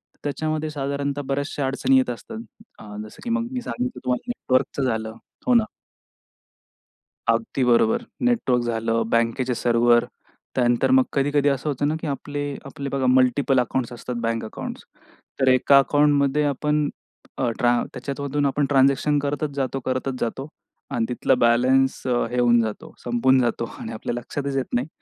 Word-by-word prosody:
तर - - -36
त्याच्यामध्ये 155 +1 -2
साधारणतः 140 -1 -2
बऱ्याचश्या 140 0 -2
अडचणी 135 0 +2
येत 130 -1 +2
असतात. 220 - -6 0.7
जसं, 110 - -13
की 240 - -4
मग 235 0 0
मी 255 -1 -3
सांगितलं 250 0 -4
तुम्हाला 125 - -1
नेटवर्कचं 130 - 0
झालं. 110 -3 -1 0.3
हो, 250 - +4
ना. 230 -2 +5 1.6
अगदी 180 - +1
बरोबर. 220 - +3 0.2
नेटवर्क 220 - +2
झालं, 115 0 0
बँकेचे 115 +2 +1
सर्व्हर, 120 0 +3 0.5
त्यानंतर 120 - +2
मग 260 0 +6
कधी-कधी 145 +1 +2
असं 140 +2 -1
होतं 145 0 0
ना, 155 - 0
की - - -4
आपले 145 +1 -4 0.2
आपले 140 0 -6
बघा 135 -1 -1
मल्टिपल 130 +1 +3
अकाउंट्स 125 0 -1
असतात, 120 +1 -6
बँक 115 0 -1
अकाउंट्स. - - -7 0.6
तर 130 - +2
एका 130 +2 +5
अकाउंट 145 +2 +3
मध्ये 145 +2 +1
आपण 150 +1 0 0.5
अ, 125 -3 +1
ट्रा 120 -1 +4 0.2
त्याच्यामधून 140 +2 -2
आपण 140 +1 +1
ट्रान्झॅक्शन 140 +1 +3
करतच 145 +1 -2
जातो 135 -1 -1
करतच 130 +1 -1
जातो 135 +5 -3 0.4
आणि 120 -4 0
तिथला 125 +2 +1
बॅलन्स 130 +3 +3
हे 120 0 0
होऊन 120 -1 +5
जातो, 110 -2 -5
संपून 125 +2 +3
जातो 120 -1 0
आणि 110 - -6
आपल्या 110 - -4
लक्षातच 140 +3 -4
येत 130 - 0
नाही 125 +5 0
135 Hz, 155 wpm, -23 LUFS, 120-145 Hz, 1.6 s, मग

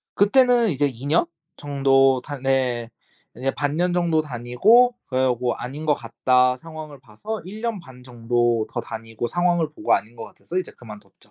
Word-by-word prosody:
그때는 240 +1 +4
이제 145 -1 +1
2 130 +1 -9
년 165 +3 +2 0.3
정도 135 -2 +3
다 145 -1 -7
네. 130 -3 0 0.4
네 130 +3 -1
반년 155 +5 -1
정도 170 -3 +2
다니고 155 - +3
그리고 125 -2 0
'아닌 140 +6 -7
것 150 - +4
같다.' 125 +2 +1
상황을 155 -2 -10
봐서 190 - -7
1 210 +4 -9
년 230 -3 -2
반 130 -6 -15
정도 120 -2 0
더 - - -3
다니고 115 +1 -6
상황을 175 -2 +1
보고 - - -1
아닌 115 +3 -3
것 115 - -7
같아서 180 - -6
이제 185 - -5
그만뒀죠. 105 -3 -14
135 Hz, 295 characters per minute, -23 LUFS, 120-170 Hz, 0.4 s, 그때는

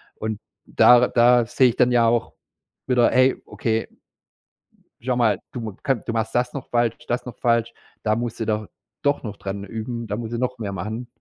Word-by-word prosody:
Und 110 -1 -4 0.3
da 125 0 +6
da 120 0 +4
sehe 125 +1 +4
ich 115 - -3
dann 125 0 +4
ja 120 -1 +4
auch 115 0 0 0.5
wieder: 125 -2 +4
„Hey, 130 +1 +3
okay 115 -1 -2 1.1
schau 125 +1 -1
mal, 115 -5 +2
du 125 - -6
m 110 -4 -6
ka 135 - +3
du 115 - -6
machst 110 -1 -2
das 125 0 0
noch 140 - -6
falsch, 120 -1 +1
das 120 - -2
noch 125 - -8
falsch, 115 -1 +1 0.3
da 110 -1 +2
musst 120 0 -4
du 115 - -1
doch 110 -1 -1 0.4
doch 145 0 +1
noch 105 -2 -6
dran 100 +1 -5
üben, 115 +3 -5
da 105 - -2
musst 115 0 -5
du 115 - -2
noch 125 0 -2
mehr 105 -3 -4
machen.“ 110 +6 -5
115 Hz, 205 wpm, -23 LUFS, 110-125 Hz, 1.1 s, da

